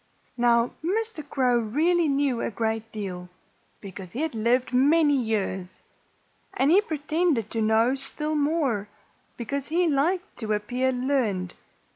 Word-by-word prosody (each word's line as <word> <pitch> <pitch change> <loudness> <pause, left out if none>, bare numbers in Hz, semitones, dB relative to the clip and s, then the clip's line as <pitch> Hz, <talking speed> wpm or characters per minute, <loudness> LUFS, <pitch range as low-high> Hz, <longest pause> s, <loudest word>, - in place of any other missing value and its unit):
Now, 235 -1 +3
Mr. 425 -1 -2
Crow 250 -3 +2
really 315 +10 +1
knew 275 -4 +1
a - - -1
great 225 0 -3
deal, 180 -4 -6 0.5
because 190 -2 -9
he 255 - -3
had 320 -3 -1
lived 240 +3 +1
many 290 +3 +4
years. 200 -6 -2 0.8
And 275 +3 +3
he 385 +4 +6
pretended 310 - -1
to 225 - -1
know 220 +3 +3
still 285 +3 -3
more, 285 -9 0 0.5
because 270 +4 -4
he 345 +3 +1
liked 325 +5 0
to 220 -2 -1
appear 245 +5 0
learned. 245 -9 -1
255 Hz, 135 wpm, -25 LUFS, 220-300 Hz, 0.8 s, he